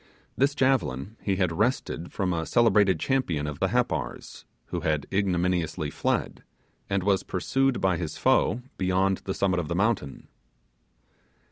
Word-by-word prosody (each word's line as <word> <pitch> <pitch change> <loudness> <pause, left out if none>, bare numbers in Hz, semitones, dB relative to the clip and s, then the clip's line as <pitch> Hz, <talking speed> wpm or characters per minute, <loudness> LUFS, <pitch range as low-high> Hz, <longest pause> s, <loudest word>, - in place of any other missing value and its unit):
This 140 +2 +2
javelin 115 - 0
he 100 - 0
had 90 -3 +1
wrested 100 -4 -1
from 95 -2 -1
a 80 -1 -2
celebrated 105 -7 +4
champion 90 - 0
of 75 -1 -5
the 95 - +2
Happars, 125 +4 -2 0.2
who - - -2
had 75 -2 -1
ignominiously 90 -5 0
fled, - - -2 0.5
and 95 -1 0
was 100 -1 +2
pursued 135 +7 0
by 95 -2 +2
his 80 -2 -4
foes 115 +6 +2 0.2
beyond 95 +1 +2
the 95 - -2
summit 95 -3 +1
of 85 - -3
the 85 - -2
mountain. 100 -7 -1
95 Hz, 145 wpm, -26 LUFS, 85-110 Hz, 0.5 s, celebrated